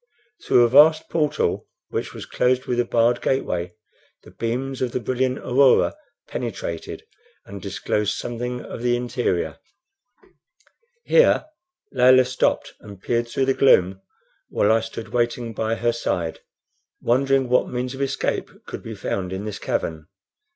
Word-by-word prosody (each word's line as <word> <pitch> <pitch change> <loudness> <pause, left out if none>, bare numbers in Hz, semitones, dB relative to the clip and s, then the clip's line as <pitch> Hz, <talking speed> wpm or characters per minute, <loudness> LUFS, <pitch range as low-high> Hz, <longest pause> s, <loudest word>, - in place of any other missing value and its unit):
Through 120 - +5
a - - +5
vast 150 +5 +5
portal, 150 -2 0 0.2
which - - -3
was - - -8
closed 130 +1 +1
with 120 -1 -1
a 120 - +2
barred 120 +1 +2
gateway, 90 -9 -1 0.5
the - - -15
beams 130 +3 -3
of 125 -2 -1
the - - 0
brilliant 130 +2 -1
aurora 130 - +3 0.3
penetrated 100 -8 -5 0.4
and 100 -1 -9
disclosed 100 +2 -1
something 125 +1 -4
of - - -8
the 120 0 +2
interior. 120 -10 -2 1.4
Here 480 -9 +4 0.5
Layelah 130 0 +6
stopped 130 0 0
and 100 -2 -12
peered 120 +3 -1
through 130 +3 0
the 135 - +2
gloom 95 -9 +3 0.5
while 105 - +2
I 110 - +4
stood 115 0 -7
waiting 120 -1 -1
by 110 +1 -1
her 120 +1 0
side, 85 -8 -2 0.6
wondering 135 +2 +2
what 125 +1 +2
means 125 +1 -3
of 135 - -6
escape 135 0 -1 0.2
could - - -7
be - - -7
found 95 -2 -3
in 95 +2 -4
this 105 - -5
cavern. 80 -1 -3
120 Hz, 145 wpm, -23 LUFS, 110-130 Hz, 1.4 s, Layelah